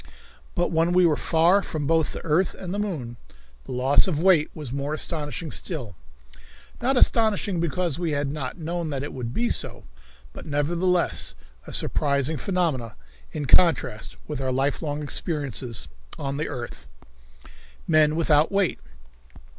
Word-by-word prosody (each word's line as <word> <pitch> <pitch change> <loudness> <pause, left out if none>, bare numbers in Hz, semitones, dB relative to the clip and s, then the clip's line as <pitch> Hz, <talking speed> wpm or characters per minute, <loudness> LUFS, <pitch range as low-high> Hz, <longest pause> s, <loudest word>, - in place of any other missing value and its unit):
But 175 -2 +1
when 165 +1 +2
we 180 0 +5
were 160 -3 +4
far 170 +6 +3
from 155 -6 -3
both 160 +1 +2
the - - -7
earth 165 +3 +2
and 180 -1 -6
the 205 - -2
moon, 145 - -3 0.5
the - - -8
loss 130 +6 +4
of 170 -6 0
weight 170 -2 +4
was 150 -6 -7
more 140 +3 -2
astonishing 155 0 -3
still 125 - -5 0.9
not 260 +2 +2
astonishing 215 -6 +3
because 170 -1 -1
we 170 -3 -1
had 145 -1 -1
not 140 -1 -4
known 170 0 -3
that 140 -2 -2
it 145 - -5
would 120 -3 -4
be 235 - 0
so, - - -2 0.5
but - - -9
nevertheless 170 +5 +1 0.3
a - - -7
surprising 140 +1 +1
phenomenon 155 - -1 0.4
in 150 -2 -3
contrast 135 -8 +3
with 150 -3 -4
our 130 -1 0
lifelong 145 +3 -1
experience 135 - -2 0.3
on 140 -1 -3
the 150 - -2
earth. 120 - -7 1.0
Men 155 -2 +4
Without 155 -1 +3
Weight. 195 -3 +1
155 Hz, 150 wpm, -25 LUFS, 140-175 Hz, 1.0 s, we